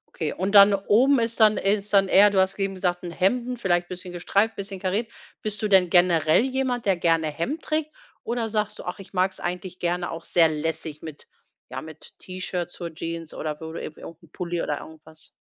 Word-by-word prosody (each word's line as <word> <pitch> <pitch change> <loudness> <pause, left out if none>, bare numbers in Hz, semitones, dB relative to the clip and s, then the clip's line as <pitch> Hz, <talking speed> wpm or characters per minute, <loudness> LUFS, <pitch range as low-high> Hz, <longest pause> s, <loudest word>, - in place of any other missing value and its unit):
Okay, 160 -3 -2
und 195 +3 -2
dann 200 0 +9
oben 235 +7 +3
ist 230 0 -1
dann 215 -1 +6
ist 200 +1 0
dann 195 -1 +4
eher, 205 +3 +6
du 195 -1 +1
hast 190 +1 +2
soeben 195 -1 -2
gesagt: 180 -1 -1
„'N 175 - -5
Hemden“, 245 +8 0
vielleicht 175 -5 0
bisschen 180 0 -7
gestreift, 200 +5 0
bisschen 195 -1 -6
kariert. 200 +5 -2 0.3
Bist 210 -1 -4
du 215 - +1
denn 190 -3 +4
generell 175 -1 +4
jemand, 260 -3 -2
der 195 -2 +3
gerne 165 -2 +1
Hemd 205 - -3
trägt 310 0 -1 0.3
oder 235 -1 -2
sagst 215 -1 -2
du: - - -7
„Ach, 180 - -5
ich 195 -1 -12
mag 185 0 +1
es - - -12
eigentlich 180 +1 -4
gerne 175 0 -2
auch 165 +1 -7
sehr 165 -2 +4
lässig“ 155 0 -4
mit, 155 -3 -10 0.4
ja, 130 +1 -5
mit 160 -1 -13
T-Shirts 180 -1 -5
zur 170 -3 -7
Jeans 165 -1 -6
oder 150 -1 -5
wo 160 0 -8
du - - -6
irgendwie 155 - -9
'n 165 -1 -13
Pulli 175 -2 -3
oder 145 - -2
irgendwas? 160 0 -13
185 Hz, 215 wpm, -24 LUFS, 165-205 Hz, 0.4 s, dann